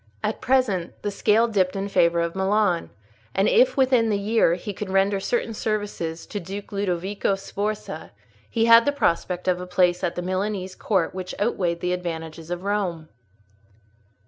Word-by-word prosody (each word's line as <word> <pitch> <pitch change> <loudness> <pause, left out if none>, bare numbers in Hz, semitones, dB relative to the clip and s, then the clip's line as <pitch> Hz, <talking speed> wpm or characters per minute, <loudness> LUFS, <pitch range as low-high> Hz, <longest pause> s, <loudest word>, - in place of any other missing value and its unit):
At - - -2
present, 235 -10 +1
the 205 - -1
scale 215 +3 +3
dipped 195 -4 +1
in 195 0 -2
favour 170 -3 +3
of 170 0 -1
Milan; 190 -2 +1 0.5
and 195 - +3
if - - +4
within 255 -4 +3
the 205 - +1
year 200 -4 +2
he 200 +3 -6
could 200 +1 -6
render 195 +1 +2
certain 230 +2 -1
services 205 -7 -3
to 205 - -5
Duke 195 +3 -7
Ludovico 195 0 -1
Sforza, 200 -3 -5 0.4
he 225 0 +1
had 230 0 +7
the 285 - +3
prospect 180 -8 0
of 180 -1 +1
a 180 - -7
place 180 0 +2
at 175 - -1
the 175 - -3
Milanese 185 0 -2
court 190 -3 0
which 185 -1 -6
outweighed 175 -6 0
the 180 0 0
advantages 165 -2 -5
of 175 +1 -4
Rome. 185 -6 -2
195 Hz, 170 wpm, -24 LUFS, 175-210 Hz, 0.5 s, had